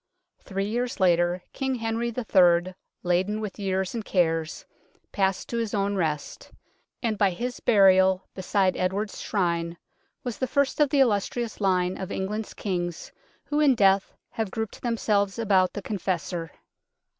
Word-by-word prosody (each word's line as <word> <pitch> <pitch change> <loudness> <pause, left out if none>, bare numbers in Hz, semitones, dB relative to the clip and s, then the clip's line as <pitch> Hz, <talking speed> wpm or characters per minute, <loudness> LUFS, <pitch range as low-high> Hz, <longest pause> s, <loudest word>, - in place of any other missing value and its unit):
Three 195 0 -3
years 240 +4 -2
later 175 -1 +2
King 265 -1 -1
Henry 225 0 -2
III., 185 -7 +3 0.3
laden 185 +4 +1
with 210 -1 -6
years 190 -2 -1
and 230 -2 -3
cares, 165 -4 0 0.5
passed 195 -2 0
to 235 - -2
his 225 -2 -2
own 200 0 0
rest, 155 -5 -3 0.5
and 220 -3 -1
by 200 - +4
his 245 +7 -4
burial 190 -3 +5
beside 190 0 +1
Edward's 195 +3 -2
Shrine 170 -4 -1 0.5
was 245 -4 -5
the 260 - 0
first 280 +3 0
of 295 -2 +4
the 275 0 +3
illustrious 230 0 0
line 185 -2 +1
of 190 - -5
England's 210 +3 -3
Kings 175 -4 -3 0.3
who 295 - -1
in 285 -4 +5
death 195 -2 +3 0.2
have 220 -3 -2
grouped 220 +1 -5
themselves 210 -4 0
about 195 -5 +2
the 205 - -6
Confessor. 180 -4 -3
195 Hz, 145 wpm, -26 LUFS, 185-225 Hz, 0.5 s, burial